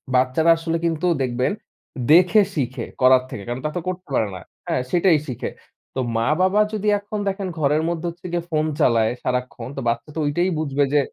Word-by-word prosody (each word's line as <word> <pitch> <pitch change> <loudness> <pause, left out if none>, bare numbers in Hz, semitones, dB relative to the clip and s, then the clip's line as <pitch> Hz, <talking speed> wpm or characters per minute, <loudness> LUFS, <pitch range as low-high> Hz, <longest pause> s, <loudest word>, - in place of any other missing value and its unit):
বাচ্চারা 130 +6 +3
আসলে 165 0 -2
কিন্তু 165 +1 0 0.2
দেখবেন, 125 +5 0 0.6
দেখে 180 +5 +6
শিখে, 130 -3 -2 0.2
করার 130 0 +6
থেকে। 100 - -7
কারণ 120 +2 -4
তা - - +1
তো - - 0
করতে 185 0 -4
পারে 110 - +2
না। 90 - -8 0.3
হ্যাঁ, 130 - 0
সেটাই 175 -3 +4
শিখে। 125 - -4 0.5
তো - - -2 0.2
মা-বাবা 185 - +2
যদি 210 0 -2
এখন 205 +1 -5
দেখেন 195 0 -2
ঘরের 150 +1 +2
মধ্যে 170 0 -3
হচ্ছে 175 +2 -12
গিয়া 175 -1 -1
ফোন 155 0 +1
চালায় 115 -5 +3
সারাক্ষণ, 125 -1 -3
তো - - -2
বাচ্চা 120 +6 -3
তো - - -2
ঐটাই 175 +6 +1
বুঝবে 145 -2 0
যে 145 - +5
155 Hz, 190 wpm, -22 LUFS, 130-175 Hz, 0.6 s, দেখে